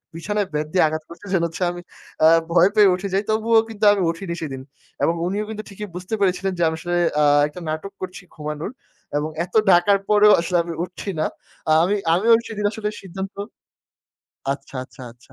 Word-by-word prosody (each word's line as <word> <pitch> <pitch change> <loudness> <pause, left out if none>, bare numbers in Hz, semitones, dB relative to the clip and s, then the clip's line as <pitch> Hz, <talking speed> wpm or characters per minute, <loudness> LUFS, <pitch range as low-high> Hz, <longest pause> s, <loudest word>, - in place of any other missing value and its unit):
বিছানায় 205 +4 -2
বেত 150 0 -1
দিয়ে 185 - +4
আঘাত 155 0 -3
করছে। 170 +4 -12
যেটা 170 -3 +2
হচ্ছে 165 +3 -5
আমি 175 0 -8 0.4
আ - - +9 0.2
ভয় 175 +2 +5
পেয়ে 210 -2 +7
উঠে 195 +2 -4
যাই 195 +2 +2
তবুও 225 +1 +3
কিন্তু 220 -1 -8
আমি 200 - -1
উঠিনি 170 +1 -6
সেদিন 135 -4 -5 0.4
এবং 165 - +3
উনিও 205 +4 -2
কিন্তু 215 -1 -5
ঠিকই 210 +1 -7
বুঝতে 185 +4 -6
পেরেছিলেন 190 0 +1
যে 175 - +1
আমি 160 - -3
আসলে 175 0 -2 0.3
আ - - +4 0.2
একটা 150 +4 -10
নাটক 155 +6 -4
করছি 185 0 -6
ঘুমানোর 150 +5 -5 0.5
এবং 150 +2 -1 0.2
এত 180 - -23 0.2
ডাকার 175 +3 +5
পরেও 210 0 +6
আসলে 175 +1 0
আমি 170 0 -5
উঠছি 180 +3 -7
না। - - +1 0.4
আ - - +4
আমি 195 +4 +1 0.2
আমিও 215 +7 +4
সেদিন 210 -2 -4
আসলে 215 -2 -3
সিদ্ধান্ত 190 +1 -7 1.2
আচ্ছা, 140 -1 -9
আচ্ছা, 130 - -14
আচ্ছা 125 +2 -23
185 Hz, 190 wpm, -22 LUFS, 165-205 Hz, 1.2 s, আ